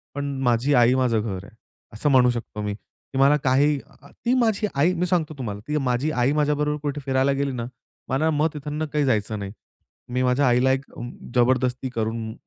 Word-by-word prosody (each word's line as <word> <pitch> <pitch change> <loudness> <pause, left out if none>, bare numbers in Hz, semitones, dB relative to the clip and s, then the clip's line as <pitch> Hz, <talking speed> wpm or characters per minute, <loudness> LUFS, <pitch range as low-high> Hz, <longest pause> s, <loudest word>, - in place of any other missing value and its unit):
पण 145 0 -2 0.2
माझी 125 +3 +2
आई 120 -1 +5
माझं 125 -4 +2
घर 95 -4 -4
आहे - - -14 0.4
असं 115 +8 0
म्हणू 125 -2 +5
शकतो 115 -3 -5
मी 105 0 -2
की 110 +5 -12
मला 140 +2 +6
अ, - - +3
काही 145 +3 +3 0.5
ती 240 - +3
माझी 220 -3 +1
आई 155 +6 +3
मी 180 0 0
सांगतो 170 -4 0
तुम्हाला 105 -6 -5
ती 150 0 0
माझी 135 +2 0
आई 125 0 +1
माझ्याबरोबर 150 0 +1
कुठे 145 0 -3
फिरायला 135 0 +2
गेली 140 0 -1
ना, 120 -2 -4 0.4
मला 145 +5 +1
मग 150 +1 +2
तिथून 150 +1 -4
काही 150 -1 0
जायचं 110 -4 0
नाही. 100 -1 -5 0.6
मी 125 +1 0
माझ्या 130 +2 +2
आईला 125 +2 +3
एक 135 +1 -1 0.5
जबरदस्ती 125 +1 +2
करून, 110 0 -2
130 Hz, 190 wpm, -24 LUFS, 120-150 Hz, 0.6 s, मला